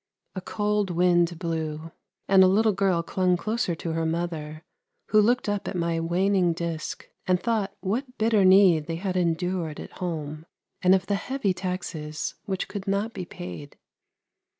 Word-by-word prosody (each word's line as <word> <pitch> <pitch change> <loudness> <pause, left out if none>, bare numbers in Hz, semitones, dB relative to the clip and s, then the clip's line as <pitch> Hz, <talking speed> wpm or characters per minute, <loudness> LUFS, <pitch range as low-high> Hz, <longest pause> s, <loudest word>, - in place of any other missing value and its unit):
A 185 - -5
cold 210 0 -1
wind 175 -1 +2
blew, 160 -2 -3 0.4
and 190 -1 +7
a - - +7
little 215 +4 +4
girl 190 -4 +1
clung 180 +1 +1
closer 215 -2 -1
to 165 0 -4
her 165 0 -1
mother, 160 -2 -3 0.5
who 215 - +5
looked 240 +3 +2
up 205 -1 -2
at - - -4
my 170 -1 0
waning 180 +1 +2
disc, 165 -2 -4 0.2
and 180 -1 +3
thought 215 -3 -1
what 250 +7 -3
bitter 220 -2 +3
need 185 -5 +6
they 165 - -2
had 185 +2 -3
endured 170 -2 -1
at - - -10
home, 155 -2 -4 0.3
and 185 +1 +6
of 190 - -1
the 205 - -1
heavy 210 -1 -1
taxes 175 -5 -4
which 190 -3 -2
could 200 -2 -6
not 200 +4 0
be 180 - -5
paid. 90 - -9
180 Hz, 165 wpm, -26 LUFS, 165-200 Hz, 0.5 s, and